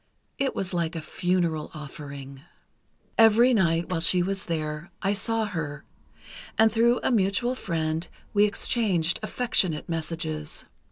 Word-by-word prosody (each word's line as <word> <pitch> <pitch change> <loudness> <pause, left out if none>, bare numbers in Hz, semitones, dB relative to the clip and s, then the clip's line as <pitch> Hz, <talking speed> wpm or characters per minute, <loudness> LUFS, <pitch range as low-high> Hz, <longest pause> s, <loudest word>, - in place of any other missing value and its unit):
It 275 -1 0
was 190 -1 -3
like 170 -1 -1
a - - -2
funeral 170 -1 -1
offering. 140 -2 -9 0.8
"Every 225 +3 +6
night 170 -5 +2
while 180 -3 0
she 175 +2 +4
was 195 +1 -3
there, 155 0 -3
I 195 +1 +2
saw 225 +2 0
her, 155 -8 -4 0.7
and 220 +1 +5
through 235 +2 +3
a - - +2
mutual 215 +3 +2
friend 165 -6 -2 0.3
we 205 0 +5
exchanged 200 -5 +1
affectionate 210 -8 +1
messages. 160 -2 -4
175 Hz, 130 wpm, -26 LUFS, 160-210 Hz, 0.8 s, Every